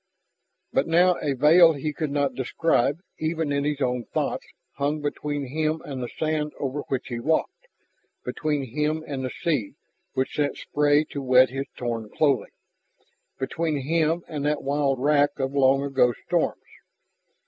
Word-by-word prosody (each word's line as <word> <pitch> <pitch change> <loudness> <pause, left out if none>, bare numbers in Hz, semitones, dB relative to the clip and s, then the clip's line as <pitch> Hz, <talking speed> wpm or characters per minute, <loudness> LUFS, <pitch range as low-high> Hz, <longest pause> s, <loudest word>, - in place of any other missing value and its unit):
But 135 - +2
now 175 +2 +4
a 145 - 0
veil 165 +5 +7
he 150 +1 -3
could 155 -1 -2
not 140 -1 0
describe, 140 +2 +1 0.2
even 160 -1 -1
in 140 0 0
his 145 -1 -1
own 125 -2 0
thoughts, - - -2 0.3
hung 145 +2 0
between 145 -1 -3
him 155 +4 -1
and 135 -3 -5
the 120 - -4
sand 155 -1 -2
over 140 +1 -2
which 135 -1 -3
he 120 -2 -3
walked, 160 - -1 0.6
between 150 -3 -1
him 155 +1 0
and 135 -2 -4
the 130 - -2
sea 135 -8 -2 0.4
which 130 -1 -1
sent 145 -1 0
spray 145 0 +2
to 140 - -4
wet 130 -1 +5
his 135 +1 -4
torn 115 -3 -3
clothing, 140 -2 +1 0.9
between 155 +2 -2
him 165 +3 +1
and 150 -4 -4
that 150 0 0
wild 140 -1 +1
wrack 145 +1 +3
of 135 0 -2
long 135 0 +4
ago 130 -3 +2
storms. - - +1
145 Hz, 160 wpm, -25 LUFS, 135-155 Hz, 0.9 s, veil